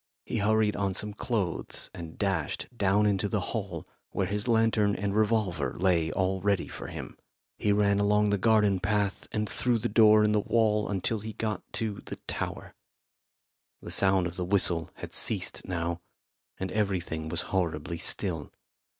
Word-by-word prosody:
He - - -3
hurried 110 +1 +2
on 100 -2 -1
some 105 0 -2
clothes 100 -5 -3
and 85 -2 -8
dashed 95 -8 -1
down 100 -1 +3
into 100 0 +1
the 105 - 0
hall, 100 -7 -4 0.2
where 95 - -1
his 105 +4 -3
lantern 110 -3 +3
and 100 0 -2
revolver 105 -8 +1
lay 85 -3 +2
all 95 0 0
ready 100 -2 +1
for - - -7
him. - - -8 0.4
He 105 - +2
ran 100 0 +3
along 105 0 +3
the 105 - +1
garden 105 -2 +3
path 100 +1 -1
and 105 -1 -1
through 120 +2 0
the 110 - -1
door 110 0 +6
in 105 - +3
the 105 - +3
wall 105 0 +2
until 105 +3 0
he 110 +1 -6
got 110 0 -2
to 110 -3 -2
the - - -6
tower. - - -4 1.1
The - - -8
sound 95 -2 +3
of 85 +1 -5
the 90 - -1
whistle 90 -3 +2
had - - -8
ceased - - 0
now, 85 -1 -2 0.6
and 95 -1 -3
everything 90 -7 -1
was 85 +1 -1
horribly 85 -3 -1
still. 80 -6 -1
100 Hz, 165 wpm, -28 LUFS, 90-105 Hz, 1.1 s, door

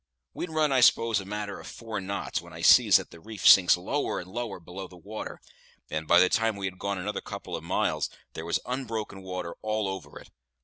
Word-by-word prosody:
We'd 175 - -5
run, 155 -2 +1
I 130 -2 +3
s'pose, 115 -2 +4
a 95 - -7
matter 105 0 -5
of - - -11
four 115 -3 -6
knots, 100 +1 -3
when - - -14
I - - -8
sees - - +7
that - - -7
the 85 - -12
reef 105 +2 -2
sinks 90 -2 +8
lower 135 +11 -2
and 90 +1 -9
lower 115 -4 -4
below 90 +3 -8
the 90 - -15
water; 105 +5 -7 0.5
and 80 0 -3
by 85 - +7
the 90 - +6
time 115 +2 +1
that - - -9
we 95 - -3
had 95 -1 -5
gone 100 0 -2
another 100 +3 -3
couple - - -6
of - - -6
miles, - - 0 0.2
there 80 - -6
was 85 - +1
unbroken 115 -6 -4
water 90 -2 -5
all 110 -1 -1
over 95 -7 -6
it. - - -14
100 Hz, 230 wpm, -28 LUFS, 90-110 Hz, 0.5 s, sinks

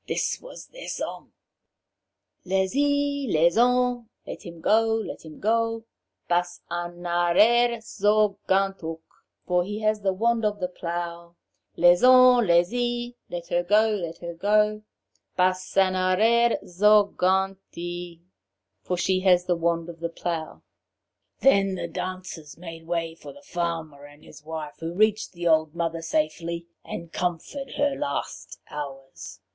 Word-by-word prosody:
This - - -1
was - - -11
their - - -10
song: - - -5 1.1
'Lez 190 0 0
y, 285 0 +1
Lez 165 0 +3
hon, 245 0 +2 0.2
(Let - - -8
him 170 -1 -10
go, 225 +5 +3
let 225 - -5
him 155 -2 -12
go,) 225 +1 0 0.4
Bas 175 0 0
an 175 0 -5
arer 215 +8 +3
zo 210 -2 +1
gant 195 0 +1
hook; 165 0 -6 0.4
(For 180 -1 +2
he 210 +4 -5
has 215 0 +1
the 195 -1 +1
wand 230 +4 +1
of 210 -1 0
the 180 -1 -2
plough;) 170 -1 -5 0.4
Lez 175 +3 +5
on, 255 -2 +7
Lez 170 0 +4
y, 240 0 -2 0.2
(Let 175 -1 -6
her 175 - +2
go, 210 +5 +3
let 170 -6 -3
her 170 0 -5
go,) 210 +4 +2 0.6
Bas 185 +1 0
an 190 -1 +4
arer 220 +6 +3
zo 210 +4 +5
gant 190 +1 +1 0.2
y!' 175 0 -6 0.6
(For 180 - -2
she 185 +1 +1
has 180 -2 +4
the 180 - +1
wand 170 0 0
of 170 -1 -10
the 170 0 -3
plough!) 165 -1 -5 0.8
Then 195 -7 +4
the - - -4
dancers 185 -5 -6
made 165 -1 -10
way 165 -1 -2
for 165 - -11
the 285 - -16
farmer 165 - -4
and 145 +1 -16
his - - -15
wife, 155 -1 -6
who 165 +1 -5
reached 215 +1 +2
the 175 0 -3
old 160 -1 +2
mother 165 -1 -2
safely, 170 - -2 0.2
and 170 -1 -8
comforted 180 - -3
her 285 -1 +1
last 140 - -4
hours. 135 -7 -8
185 Hz, 150 wpm, -25 LUFS, 170-215 Hz, 1.1 s, on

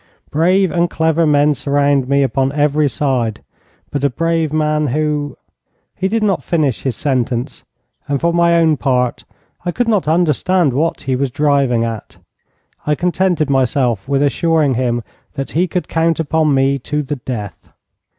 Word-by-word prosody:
'Brave 185 +4 +2
and 175 0 +1
clever 160 0 +1
men 145 0 +3
surround 140 -1 +1
me 140 0 +3
upon 135 +1 0
every 150 0 +2
side. 125 -7 -1 0.5
But 140 -1 -3
a 140 - +3
brave 165 +2 -1
man 150 -1 0
who 145 0 -2 0.3
' - - -49
He 190 - +1
did 220 +2 0
not 195 -3 +1
finish 150 -8 0
his 130 -4 -2
sentence, 125 -1 -2 0.4
and 140 -1 -1
for 170 0 +1
my 170 0 +3
own 160 -2 +3
part 125 -3 0 0.4
I 175 - -2
could 245 +5 -1
not 210 -8 +1
understand 170 -1 +2
what 160 +6 -1
he 135 -2 -1
was 135 +1 -1
driving 140 -4 +1
at. 115 -3 -6 0.7
I 150 - +2
contented 180 -2 0
myself 130 -4 0
with 140 0 +2
assuring 155 0 +2
him 120 -1 -1 0.3
that 135 -1 -4
he 175 +4 +1
could 180 +1 -3
count 165 0 0
upon 160 -1 +1
me 135 +1 +2
to 150 +3 -3
the 145 +1 -4
death. 115 -5 -7
145 Hz, 165 wpm, -17 LUFS, 135-165 Hz, 0.7 s, men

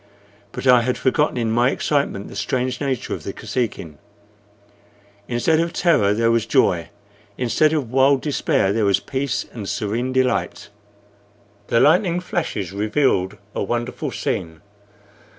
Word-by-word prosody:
But - - -6
I 125 -2 +6
had 125 +1 -1
forgotten 150 +1 +1
in 115 -2 0
my 120 +2 +3
excitement 140 -9 -1
the - - -11
strange 125 +4 -2
nature 135 -4 -2
of - - -6
the - - -5
Kosekin. 95 - -4 1.3
Instead 125 +7 +1
of 170 0 -1
terror 160 - +3
there 115 +1 +2
was 115 -1 +1
joy, 90 - +2 0.5
instead 125 +5 +2
of 145 -7 -2
wild 135 +1 +3
despair 140 - +1
there 110 -1 +1
was 100 -1 +3
peace 130 +6 -3
and 105 -5 -6
serene 120 +3 -2
delight. 130 -5 -1 1.0
The 115 - +2
lightning 175 - +3
flashes 155 - -3
revealed 105 -1 0 0.2
a - - -3
wonderful 120 +4 -3
scene. 80 -3 -4
125 Hz, 140 wpm, -21 LUFS, 105-140 Hz, 1.3 s, I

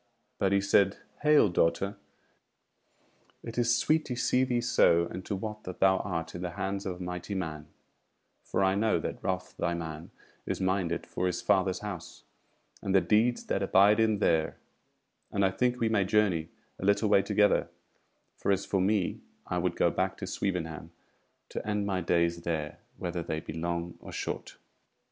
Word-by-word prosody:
But 95 - +2
he 100 0 +3
said: 100 0 +3 0.2
"Hail, 150 -6 +6
daughter! 85 +3 +1 1.5
It 115 +1 -4
is 120 0 +3
sweet 155 +6 +2
to 125 - -3
see 125 +1 +2
thee 125 -2 +1
so, 85 -7 +4
and 90 +2 -7
to 100 - -1
wot 105 +2 -5
that 90 - -7
thou 95 -1 +5
art 85 -5 -3
in 90 - -6
the 90 -1 -4
hands 100 +1 -2
of 90 - -3
a - - -5
mighty 90 +2 -5
man: 80 -5 -4 0.8
for - - 0
I 95 0 +3
know 110 +2 +2
that - - -5
Ralph 90 -1 -2
thy 85 0 -1
man 80 -1 -6 0.4
is - - -2
minded 95 -2 0
for 90 - -2
his 90 -1 -2
Father's 95 -1 +2
House, 90 -5 -7 0.6
and 95 - 0
the - - +8
deeds 110 +7 +2
that 95 - -1
abide 100 +2 +5
him 110 -1 +3
there; 80 -6 +1 0.7
and 100 -1 +2
I 95 - +2
think 125 +4 0
we 115 - +2
may 110 -3 +2
journey 95 -5 +1 0.3
a - - -4
little 100 +2 +3
way 100 -1 +5
together; 105 0 +2 0.7
for - - 0
as 100 0 +1
for 95 - 0
me, 100 -1 +1 0.2
I 90 - -2
would 90 -1 0
go 85 - +3
back 95 +2 -1
to 100 - -5
Swevenham 85 -4 -3 0.6
to - - -5
end 105 -1 0
my 95 -2 -1
days 85 0 +1
there, 80 -3 -3 0.2
whether 85 -1 -3
they 80 -1 -3
be - - -8
long 85 +1 -3
or - - -10
short." - - -5
95 Hz, 180 wpm, -29 LUFS, 85-105 Hz, 1.5 s, the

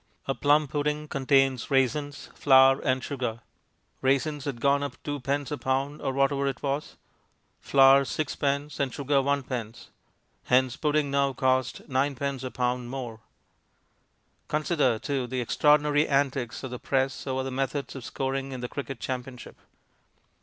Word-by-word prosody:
A 135 - +1
plum 145 +3 +3
pudding 150 +1 -2
contains 135 -2 +2
raisins, 140 +2 0
flour, 135 -1 +5
and 130 -2 0
sugar. 125 -4 -3 0.6
Raisins 140 +2 0
had 135 -5 -4
gone 140 +3 +3
up 145 - -4
2d. 145 0 -2
a 150 - -2
pound, 135 +3 -1
or 135 - -1
whatever 140 +1 +1
it 135 - -4
was, 140 +1 -2 0.6
flour 135 0 +6
6d., 140 +1 -2
and 135 -2 0
sugar 140 +2 0
1d. 130 -5 -2 0.6
Hence 125 0 +3
the - - -12
pudding 150 -2 +1
now 140 0 +3
would 135 - -6
cost 130 -1 0
9d. 135 0 -1
a 130 - -3
pound 125 -1 -2
more! 120 -4 -6 1.3
Consider, 150 -6 +1
too, 130 +1 -2
the 130 +1 -3
extraordinary 150 +4 +3
antics 135 -4 0
of 130 - -5
the 125 - -5
press 135 0 -1
over 130 0 -1
the 135 - -4
methods 135 +2 -3
of 135 - -7
scoring 135 +2 -3
in 125 - -6
the 125 - -3
cricket 135 -1 -6
championship. 125 0 -6
135 Hz, 150 wpm, -27 LUFS, 130-145 Hz, 1.3 s, flour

